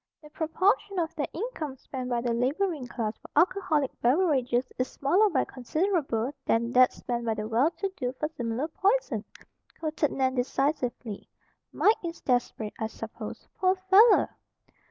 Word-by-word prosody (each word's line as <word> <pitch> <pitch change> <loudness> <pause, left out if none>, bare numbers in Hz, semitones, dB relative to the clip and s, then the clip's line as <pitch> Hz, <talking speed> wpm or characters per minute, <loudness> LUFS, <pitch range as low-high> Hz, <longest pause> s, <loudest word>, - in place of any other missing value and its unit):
"The 300 - -14
proportion 380 +6 +1
of 330 -2 -1
their 300 -3 -2
income 330 - -5
spent 255 -1 -6
by 240 -1 0
the 240 -1 0
laboring 280 +4 0
class 225 -3 -3
for - - -15
alcoholic 315 -7 +2
beverages 255 -3 +2
is 255 - +1
smaller 375 +10 +2
by 280 -8 +1
considerable 280 - -1
than 235 +1 +1
that 255 0 +6
spent 240 -1 -4
by 225 -1 0
the 215 0 -4
well 235 +7 +3
to 390 +3 -3
do 250 -2 -1
for 300 +4 -2
similar 245 -1 -3
poison!" 415 +10 0 0.6
quoted 310 -2 0
Nan 260 -1 +1
decisively. 250 -4 -2 0.4
"Mike 430 - +4
is 335 0 -5
desperate, 245 -4 -1
I 220 - -1
suppose, - - -8
poor 370 0 +3
fellow!" 385 +5 +5
280 Hz, 155 wpm, -28 LUFS, 245-345 Hz, 0.6 s, that